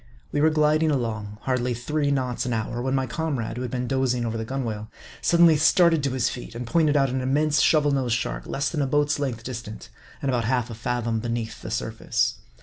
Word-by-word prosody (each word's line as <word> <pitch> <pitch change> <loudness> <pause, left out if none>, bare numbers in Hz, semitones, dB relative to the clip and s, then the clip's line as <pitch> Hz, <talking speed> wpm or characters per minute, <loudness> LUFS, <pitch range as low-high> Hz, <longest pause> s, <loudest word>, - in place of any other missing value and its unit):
We 145 - 0
were 155 - +5
gliding 155 0 +3
along, 110 -7 -2
hardly 125 -2 0
three 145 +4 -1
knots 130 -3 -1
an 125 - -1
hour, 115 +2 -2
when 130 +1 0
my 135 -1 +1
comrade, 130 -7 -3
who - - -3
had 125 - -3
been 125 -1 -2
dozing 130 -2 0
over 115 0 -2
the 110 - -2
gunwale, 110 -4 -4 0.3
sud 170 0 +3
denly 165 -3 +7
started 165 0 +5
to 140 -2 -1
his 130 -2 +1
feet, 120 -2 -6
and 120 +1 -4
pointed 150 +3 +2
out 135 -2 +2
an 130 0 -1
immense 145 +3 +2
Shovel 150 -2 +4
nosed 130 -4 +1
Shark, - - -3
less 140 - -1
than 155 - -1
a 140 - +1
boat's 145 +1 +1
length 125 -5 -3
distant, 115 -3 -7 0.3
and 140 - -2
about 120 -3 0
half 125 0 0
a - - -5
fathom 115 0 -2
beneath 115 0 -4
the - - -7
surface. 115 0 -1
125 Hz, 225 wpm, -25 LUFS, 115-145 Hz, 0.3 s, denly